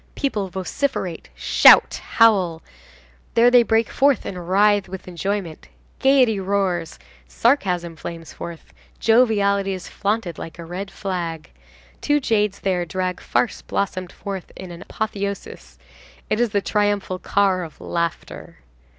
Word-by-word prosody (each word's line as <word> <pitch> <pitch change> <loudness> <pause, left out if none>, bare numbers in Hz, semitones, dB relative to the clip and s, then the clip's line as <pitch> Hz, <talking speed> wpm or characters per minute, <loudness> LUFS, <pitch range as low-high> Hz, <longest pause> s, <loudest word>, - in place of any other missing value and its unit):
People 215 -8 -1
vociferate, 185 - -3
shout, - - +6
howl, 190 -8 +3 0.7
there 235 +1 +6
they 245 -1 +7
break 225 0 +1
forth 275 0 +2
and 180 -3 -6
writhe 205 0 +3
with 190 0 -8
enjoyment; 180 -1 -4 0.3
gayety 260 -6 +4
roars; 190 -3 -1 0.3
sarcasm 180 - +1
flames 165 +1 -8
forth, 170 -1 -9 0.3
joviality 205 -4 +3
is 185 -1 -7
flaunted 200 -5 -2
like 165 - -8
a 170 - -8
red 185 +4 -6
flag; 170 -6 -5 0.5
two 295 0 +2
jades 210 -6 0
there 185 -2 0
drag 180 +1 -3
farce 245 - -1
blossomed 185 -2 -3
forth 195 -3 -7
into 185 -2 -9
an 170 - -11
apotheosis; 200 - -5 0.5
it 215 - +1
is 240 -1 +2
the 200 -1 0
triumphal 205 -3 0
car 195 -2 +1
of 160 - -10
laughter. 170 -1 -4
195 Hz, 130 wpm, -22 LUFS, 175-215 Hz, 0.7 s, they